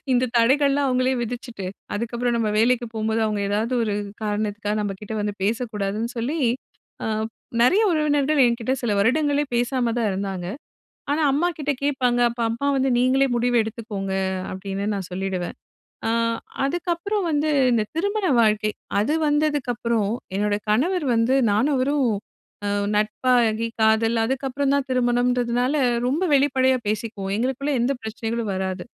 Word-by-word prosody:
இந்த 250 0 +2
தடைகள்லாம் 275 +3 +3
அவங்களே 255 +1 +2
விதிச்சுட்டு, 235 -4 -5 0.3
அதுக்கப்புறம் 235 +2 -1
நம்ம 225 -2 0
வேலைக்கு 240 +1 +3
போம்போது 220 +1 0
அவங்க 210 -1 -1
ஏதாவது 220 +5 -1
ஒரு 210 -2 -1 0.3
காரணத்துக்கா 210 0 -2
நம்ம 200 -2 -2
கிட்ட 210 +1 -7
வந்து 205 0 -2
பேசக்கூடாதுன்னு 220 0 -1
சொல்லி, 270 +8 -2 0.7
அ - - -2 0.6
நெறைய 375 - +5
உறவினர்கள் 295 -1 +2
என்கிட்ட 235 +1 0
சில 230 -4 0
வருடங்களே 290 +6 +2
பேசாம 240 0 +1
தான் 225 -3 +1
இருந்தாங்க. 190 -2 -3 0.7
ஆனா, 305 - +1
அம்மாகிட்ட 300 -1 0
கேட்பாங்க. 255 -4 +1
அப்ப 235 +1 -9
அம்மா 235 +5 -2
வந்து 265 0 +2
நீங்களே 265 +2 +3
முடிவு 245 +1 +1
எடுத்துக்கோங்க 210 -3 -5 0.4
அப்டின்னு 195 +1 -4
நான் 190 -3 -5
சொல்லிடுவேன். 185 -1 -3 0.5
ஆ - - +1 0.5
அதுக்கப்புறம் 350 +6 -1
வந்து 300 0 +1 0.2
இந்த 235 -3 +2
திருமண 405 +4 0
வாழ்க்கை 215 -1 +3 0.3
அது 230 +10 +1
வந்ததுக்கப்புறம் 255 -8 0 0.2
என்னோட 205 +1 +1
கணவர் 305 - +1
வந்து 230 +3 +2
நானும் 225 +9 +2
அவரும் 275 +2 +1
ஒரு 205 -2 -2 0.7
நட்பாகி 225 +1 +2
காதல் 220 +1 +3
அதுக்கப்புறம் 270 +3 -1
தான் 280 -1 0
திருமணம்ன்றதுனால 245 +1 +1 0.3
ரொம்ப 295 +8 0
வெளிப்படையா 260 -2 +3
பேசிக்குவோம் 210 -2 -2
எங்களுக்குள்ள 265 +4 -1
எந்த 255 +4 +2
பிரச்சனகளும் 225 0 -3
வராது. 190 -1 -3
240 Hz, 135 wpm, -23 LUFS, 215-275 Hz, 0.7 s, நெறைய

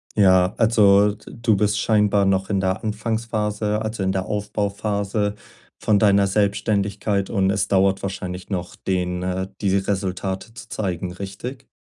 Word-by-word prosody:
Ja, 95 -2 +4
also, 105 -3 +5
d 105 - -17 0.2
du 115 -2 +3
bist 105 +1 +1
scheinbar 105 -2 +3
noch 95 0 +1
in 100 -2 +1
der 95 0 -1
Anfangsphase, 105 -1 -1
also, 110 -2 -3
in 95 - +1
der 95 -1 -2
Aufbauphase 105 0 -2 0.4
von 105 -2 +2
deiner 100 -1 +4
Selbständigkeit. 100 0 0
Und 95 -2 +2
es 100 0 0
dauert 95 0 +2
wahrscheinlich 90 -2 -5
noch, 90 -3 -4
den 90 -1 -2
äh, 95 +1 -2
die 100 -2 +2
Resultate 95 +1 -3
zu 115 - -11
zeigen, 90 -3 -3
richtig? 100 +8 -7
100 Hz, 145 wpm, -22 LUFS, 95-105 Hz, 0.4 s, also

